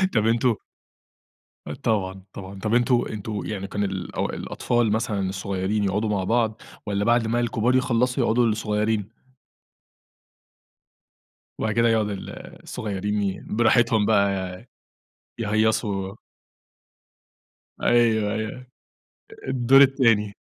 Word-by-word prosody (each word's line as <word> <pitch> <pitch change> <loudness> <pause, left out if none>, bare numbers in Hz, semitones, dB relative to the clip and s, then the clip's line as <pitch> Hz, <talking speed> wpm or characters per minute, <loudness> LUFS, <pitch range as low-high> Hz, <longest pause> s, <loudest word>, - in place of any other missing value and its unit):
طب 110 0 +3
أنتم 115 0 +2 1.3
طبعًا 95 -3 -1
طبعًا، 95 0 -9
طب 110 +3 -2
أنتُم 120 0 +3
أنتُم 105 0 -5
يعني 100 -2 -4
كان 100 +1 -2
الأو 95 -2 -3
الأطفَال 120 -3 -1
مثلًا 105 -4 -1
الصغيرين 95 +2 -2
يقعُدوا 105 +3 0
مع 100 -3 0
بعض، 110 +1 0 0.2
والّا 100 0 -1
بعد 120 -1 +3
ما 120 +2 +1
الكبار 120 +1 +1
يخلَّصوا 125 0 +1
يقعُدوا 120 +1 +3
الصغيرين؟ 105 -1 0 2.5
وبعد 110 0 -1
كده 115 0 +3
يقعُد 110 -2 +2
ال 100 -2 -6 0.3
الصغيرين 105 0 -3
ي 95 -1 -2
براحتهم 115 -1 +3
بقى 100 -2 +3 1.1
يهيّصوا 105 -3 0 1.7
أيوه 110 -3 +3
أيوه، 110 +4 -5 0.8
الدور 130 +1 +5
التاني. 115 -7 +3
110 Hz, 105 wpm, -24 LUFS, 100-120 Hz, 2.5 s, الدور